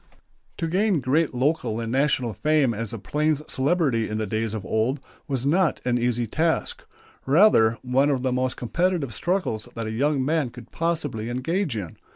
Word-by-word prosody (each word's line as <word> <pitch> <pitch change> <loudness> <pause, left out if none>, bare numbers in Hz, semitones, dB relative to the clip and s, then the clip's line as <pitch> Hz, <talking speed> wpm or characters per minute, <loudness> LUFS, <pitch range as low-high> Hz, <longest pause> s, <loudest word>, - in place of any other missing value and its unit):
To 165 - -2
gain 190 +1 +2
great 140 +5 +1
local 130 -3 0
and 115 -1 -3
national 130 -3 +1
fame 140 +3 +2
as 115 -1 -4
a 115 - -5
plains 150 +9 0
celebrity 135 -5 +1
in 110 - -2
the 110 - -1
days 110 +2 -2
of 105 -3 -5
old 115 +8 0 0.3
was 135 -2 -2
not 170 +4 +2
an 125 -1 +1
easy 120 0 0
task; 165 - -1 0.5
rather 135 - +5
one 130 +3 +2
of 135 -3 0
the 130 - +1
most 130 0 -1
competitive 165 +1 -1
struggles 175 - -2
that 115 -1 -4
a 110 - -3
young 135 +3 +1
man 155 -3 +1
could 120 -1 -13
possibly 150 -9 -2
engage 140 - -1
in. 90 -6 -6
130 Hz, 180 wpm, -24 LUFS, 115-155 Hz, 0.5 s, rather